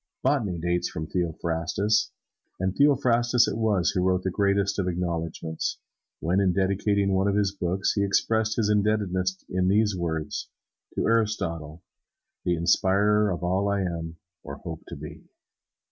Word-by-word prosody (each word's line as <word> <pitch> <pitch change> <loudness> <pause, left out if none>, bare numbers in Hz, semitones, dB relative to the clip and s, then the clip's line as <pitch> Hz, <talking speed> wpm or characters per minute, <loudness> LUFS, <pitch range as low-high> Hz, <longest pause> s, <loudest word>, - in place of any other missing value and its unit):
Botany 120 -10 +1
dates 85 +1 -1
from 80 -3 -5
Theophrastus. 85 +4 0 0.5
And 95 0 0
Theophrastus 125 -4 +3
it - - -2
was 105 -6 +1
who 90 - 0
wrote 90 0 +1
that 95 - -1
greatest 100 +1 +1
of 95 - 0
acknowledgments, 85 -2 -3 0.4
when, 85 +5 +1
in 95 -2 +2
dedicating 100 +1 +1
one 95 +1 +2
of 100 - +1
his 100 -1 +2
books, 95 -1 -1
he 100 - 0
expressed 110 +2 +1
his 110 -3 +1
indebtedness 100 -3 0
in 90 0 0
these 105 +1 +3
words: 80 -3 -3 0.5
"To - - 0
Aristotle, 90 -9 -1 0.6
the 90 - +2
inspirer 100 +5 +3
of 90 -1 -3
all 95 +3 +1
I 100 0 +1
am 85 -2 -4 0.2
or - - -7
hope - - -7
to - - -7
be." - - -9
95 Hz, 150 wpm, -26 LUFS, 85-105 Hz, 0.6 s, Theophrastus